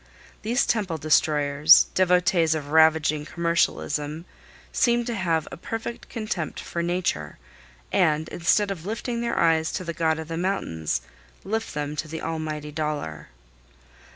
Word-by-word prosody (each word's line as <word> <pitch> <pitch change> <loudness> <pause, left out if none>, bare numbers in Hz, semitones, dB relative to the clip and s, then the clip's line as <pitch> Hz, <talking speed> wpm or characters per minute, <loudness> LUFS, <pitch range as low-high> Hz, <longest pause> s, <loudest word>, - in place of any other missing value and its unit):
These 235 +4 +1
temple 195 -8 0
destroyers, 150 0 +5
devotees 180 -3 +3
of 145 -2 -5
ravaging 155 -1 +4
commercialism, 165 -2 -1 0.5
seem 240 -1 +2
to 240 - -2
have 170 -6 0
a - - -7
perfect 225 +6 -6
contempt 215 -8 -4
for 170 - -4
Nature, 170 - -2 0.5
and, 155 +1 +2
instead 200 +4 +1
of 175 -5 -6
lifting 235 +4 -3
their 235 - -2
eyes 160 -1 +3
to - - -3
the 170 -1 -4
God 160 -1 +1
of 160 -1 -6
the 165 0 -4
mountains, 80 - -1 0.4
lift 220 -2 -3
them 150 0 -3
to 155 - -3
the 160 +1 -6
Almighty 155 -2 -4
Dollar. 145 - -4
160 Hz, 140 wpm, -25 LUFS, 150-185 Hz, 0.5 s, destroyers